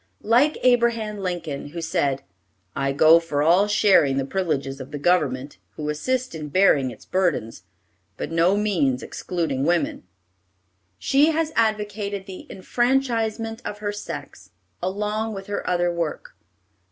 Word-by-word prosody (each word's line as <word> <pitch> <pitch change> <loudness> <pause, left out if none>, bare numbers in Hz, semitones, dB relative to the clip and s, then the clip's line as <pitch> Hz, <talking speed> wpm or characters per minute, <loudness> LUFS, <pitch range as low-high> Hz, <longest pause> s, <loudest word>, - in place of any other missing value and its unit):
Like 250 +8 +3
Abraham 235 -4 +2
Lincoln, 170 -7 -4
who 165 +4 -7
said, 160 -5 -1 0.5
"I 135 0 0
go 155 +4 +6
for 150 -3 -1
all 180 +6 +4
sharing 190 -10 +4
the 135 - 0
privileges 140 -5 -2
of 130 - -9
the 145 - -5
government, 145 - 0 0.2
who 150 0 -4
assist 255 +12 -1
in 155 -2 -6
bearing 145 -6 +4
its 120 - -12
burdens, 170 - -1 0.6
by - - -3
no 170 +4 +2
means 165 -12 +1
excluding 165 -7 -3
women," 170 +3 0 1.0
she 285 - +3
has 315 0 -1
advocated 210 -3 -1
the 190 -2 -10
enfranchisement 230 +1 -1
of 205 - -5
her 205 -1 -3
sex, 205 - -8 0.3
along 210 +3 -2
with 195 0 -7
her 205 0 -3
other 175 -1 +1
work. 170 -3 -4
185 Hz, 140 wpm, -23 LUFS, 150-215 Hz, 1.0 s, go